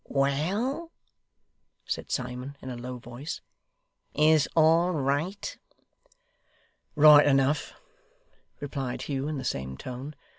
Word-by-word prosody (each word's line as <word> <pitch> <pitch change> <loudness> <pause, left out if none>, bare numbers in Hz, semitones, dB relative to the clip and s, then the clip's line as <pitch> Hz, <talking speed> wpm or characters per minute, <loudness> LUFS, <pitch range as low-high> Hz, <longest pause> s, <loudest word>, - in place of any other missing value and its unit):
'Well!' 195 - -1 0.9
said - - -4
Simon, 125 +2 -4
in 130 - -7
a - - -5
low 125 +1 -6
voice; 125 +6 -7 0.8
'is 155 -1 +4
all 165 +3 +4
right?' 150 +7 -2 1.4
'Right 150 -1 +8
enough,' 135 +1 +2 0.9
replied 135 -3 -4
Hugh, 140 -1 -3
in 155 -1 -3
the 130 - -5
same 65 - -3
tone. 130 - -7
140 Hz, 105 wpm, -27 LUFS, 130-155 Hz, 1.4 s, Right